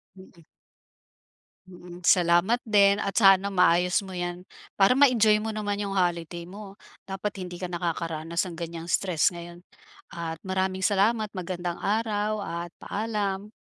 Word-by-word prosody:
Mhm. 185 -3 -17 1.3
Mm, 175 -1 -12
salamat 175 +5 +4
din 200 -2 +4
at 200 -1 -3
sana 195 0 +5
maayos 180 0 +3
mo 190 -2 -8
'yan, 175 0 -4 0.3
para 200 +6 +4
ma-enjoy 230 -6 +5
mo 220 +1 -4
naman 205 -1 -2
'yung 200 -1 -3
holiday 175 -2 -2
mo. 200 0 -10 0.3
Dapat 195 +1 -5
hindi 180 0 -9
ka 180 - -4
nakakaranas 170 0 -3
ng 165 - -9
ganyang 170 0 -6
stress 180 -5 +2
ngayon 175 0 -10 0.5
at 165 -1 -6
maraming 190 0 -2
salamat, 215 +3 +2
magandang 175 -1 -4
araw 215 0 -1
at 170 -2 -5
paalam. 205 -2 -3
190 Hz, 135 wpm, -26 LUFS, 175-205 Hz, 1.3 s, sana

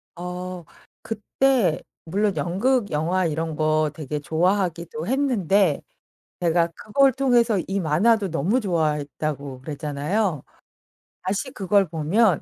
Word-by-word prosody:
어 180 0 -6 0.4
그때 225 - +1 0.2
물론 200 +4 0
연극, 205 +5 +1
영화 175 +5 +1
이런 160 0 -2
거 155 0 +2
되게 150 -1 -4
좋아하기도 170 0 -1
했는데 205 - +2 0.6
제가 170 -1 +3
그걸 275 +5 +3
통해서 240 -4 +3
이 195 +1 -1
만화도 195 +6 +2
너무 175 - +1
좋아했다고 150 - -2
그랬잖아요. 150 +4 -2 0.8
다시 200 +8 -2
그걸 195 -2 +2
보면 170 +4 +2
180 Hz, 245 characters per minute, -23 LUFS, 155-210 Hz, 0.8 s, 제가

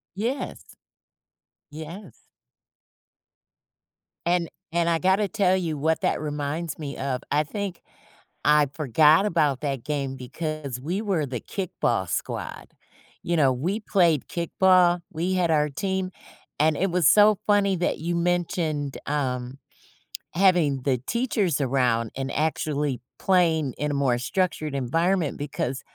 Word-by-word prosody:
Yes. 235 +8 -4 1.0
Yes. 160 +7 -10 2.0
And 175 -1 +1 0.2
and 170 0 +1
I 165 - +2
gotta 190 +3 +2
tell 195 -3 +2
you, 165 -5 -2
what 160 +3 0
that - - +1
reminds 150 +2 -3
me 145 -3 -5
of, 130 -2 -2
I 150 +1 +3
think 195 +2 -5 0.6
I 150 0 +5
forgot 155 - +4
about 150 -9 +1
that 135 -5 -3
game 140 -3 -2
because 140 0 -5
we 175 +10 -2
were 190 -8 0
the 125 -3 -4
kickball 120 - -2
squad. - - -4 0.5
You 170 -1 0
know, 135 -3 +4
we 175 - -2
played 175 - +2
kickball. 175 0 +3
We 170 +3 -1
had 180 -2 +1
our 150 -1 +2
team, 190 +4 -2 0.5
and 155 +1 +3
it 190 0 0
was 175 -4 +3
so 210 +1 +6
funny 200 -2 +3
that 175 - -1
you 170 +2 -2
mentioned, 170 -4 -1
um, 130 -3 -2 0.8
having 170 -8 +3
the 130 -3 +1
teachers 220 - 0
around 125 -4 +1
and 135 0 -3
actually 150 -3 -1 0.2
playing 165 -7 +2
in 150 +1 -1
a - - -2
more 135 -3 +2
structured 155 +1 -1
environment 165 +5 0
because 135 -2 -3
160 Hz, 130 wpm, -25 LUFS, 140-180 Hz, 2.0 s, so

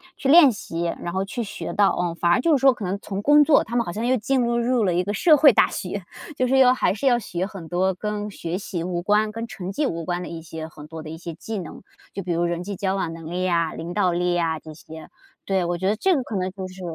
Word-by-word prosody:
去 270 - -2
练 290 -5 +8
习， 170 -4 -5 0.2
然 170 - -4
后 190 +2 -1
去 235 +5 -4
学 205 - -6
到， 200 -1 +4
嗯。 175 -1 -2
反 170 0 +1
而 175 - +4
就 315 +4 +3
是 270 - -1
说 270 -1 +6
可 220 -5 -6
能 185 +2 -2
从 200 0 -5
工 295 +5 +6
作 295 0 +4
他 235 - -6
们 235 -1 +2
好 - - -4
像 220 +6 -3
又 255 +1 +3
进 255 +3 0
入 235 0 +1
入 235 -1 +1
了 180 - +1
一 180 +1 +1
个 205 - -3
社 310 - +5
会 290 -1 +7
大 - - +4
学， 190 +1 -5 0.3
就 255 - +1
是 265 +2 +2
要 255 -1 +6
还 255 - +1
是 220 +7 -5
要 245 -3 +4
学 180 -5 -3
很 190 -5 -9
多 185 +3 +1
跟 210 +2 -4
学 175 -2 -4
习 180 -4 -5
无 175 -1 -2
关、 210 +3 +1
跟 230 +1 -4
成 195 -2 -6
绩 300 - 0
无 165 -9 -3
关 175 +1 -2
的 - - -7
一 165 -1 -7
些 160 0 -7
很 150 -1 -12
多 160 0 -8
的 155 - -8
一 160 - -7
些 170 0 -7
技 220 +7 -6
能。 170 - -9 0.3
就 195 - -5
比 175 - -3
如 170 +1 +1
人 170 0 -2
际 200 +1 -6
交 190 +1 -1
往 175 -4 -2
能 165 -1 -9
力 180 +1 -2
呀、 170 -3 +1
领 170 +2 -6
导 185 -3 +1
力 175 +1 0
呀 165 -2 0
这 155 -1 -11
些。 160 0 -12 0.4
对， 190 -2 0
我 175 0 -1
觉 190 +2 0
得 215 - 0
这 375 - +2
个 265 - -1
可 215 -4 -4
能 185 0 -1
就 190 -1 -7
是 185 0 -12
190 Hz, 315 characters per minute, -23 LUFS, 175-230 Hz, 0.4 s, 练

